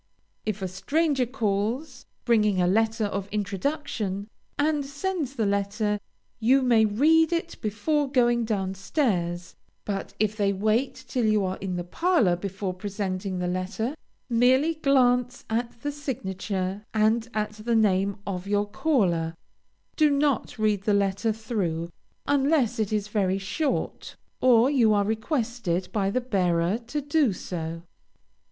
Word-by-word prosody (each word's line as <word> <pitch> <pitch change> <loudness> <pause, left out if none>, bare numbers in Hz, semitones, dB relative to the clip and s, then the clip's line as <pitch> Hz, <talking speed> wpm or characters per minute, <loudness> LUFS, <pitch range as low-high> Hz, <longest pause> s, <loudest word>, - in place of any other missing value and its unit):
If 210 -2 -2
a - - 0
stranger 275 - 0
calls, 245 +3 -2 0.2
bringing 210 -5 +3
a 180 - +3
letter 220 +4 +2
of 200 -1 -3
introduction, 205 - -2 0.3
and 295 0 +1
sends 285 0 -3
the 225 -4 0
letter, 205 +1 0 0.4
you 260 +4 +4
may 230 -3 +5
read 310 +10 +4
it 340 0 -2
before 275 +8 0
going 240 -3 +3
down 195 -4 -1
stairs, 180 - -1 0.3
but 200 -2 -4
if 215 0 +1
they 200 -2 +1
wait 220 +7 +1
till 245 -3 0
you 210 -2 +3
are 185 0 -2
in 185 -2 -4
the 175 - -2
parlor 240 - +2
before 190 +1 -4
presenting 190 -1 -3
the 180 - -2
letter, 190 +8 -2 0.3
merely 255 +6 +3
glance 250 -4 +2
at 235 +1 -2
the 290 - -1
signature 195 -8 -3
and 220 +2 +2
at 215 0 0
the 215 +2 -2
name 200 -2 +2
of 185 -1 -4
your 205 0 +1
caller; 185 - +1 0.6
do 305 -2 +5
not 280 -3 0
read 215 -2 +1
the 205 0 +2
letter 200 +2 +1
through, 190 -7 -3 0.3
unless 275 -4 +2
it 215 -1 0
is 210 -1 0
very 195 -3 +1
short, 270 +10 -2 0.3
or 245 -1 +6
you 235 -7 +4
are 205 - +3
requested 220 - -1
by 195 -3 0
the 255 +5 0
bearer 185 -4 +1
to 295 +4 -2
do 285 -3 +2
so. 165 -2 -5
215 Hz, 145 wpm, -26 LUFS, 195-255 Hz, 0.6 s, or